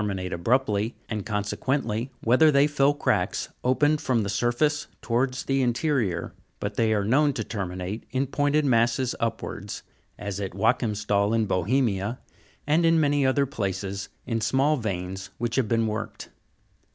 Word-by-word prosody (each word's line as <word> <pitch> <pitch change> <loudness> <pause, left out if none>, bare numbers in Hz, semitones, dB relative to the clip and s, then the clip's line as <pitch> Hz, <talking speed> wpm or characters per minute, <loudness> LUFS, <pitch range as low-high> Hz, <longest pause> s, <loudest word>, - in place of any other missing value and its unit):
minate 95 -3 -3
abruptly, 110 +3 +1
and 105 -3 -3
consequently 110 +3 -1
whether 130 +7 +5
they 140 -1 +5
fill 145 -1 +3
cracks - - 0
opened 145 +4 +2
from 120 -4 +1
the 100 - -3
surface 120 +9 +1
towards 125 +2 0
the 135 0 +1
interior; 120 - 0 0.3
but - - -3
they 110 -1 +1
are 105 -2 +1
known 145 +7 +3
to 115 - -3
terminate 95 0 -4
in 130 +1 0
pointed 145 +2 +1
masses 120 0 +2
upwards, 110 -3 -4 0.3
as 100 -1 -5
at 95 -3 -4
Joachimstal 105 0 +1
in 110 -1 +2
Bohemia, 105 +2 0 0.5
and 155 +4 +3
in 165 0 +4
many 145 -2 +3
other 140 +2 +2
places, 100 -4 -3 0.2
in 115 -2 -1
small 135 +7 +2
veins 95 -4 -4
which 120 0 -2
have 130 -4 +2
been 115 +1 +2
worked. 110 0 -4
115 Hz, 150 wpm, -26 LUFS, 100-135 Hz, 0.5 s, whether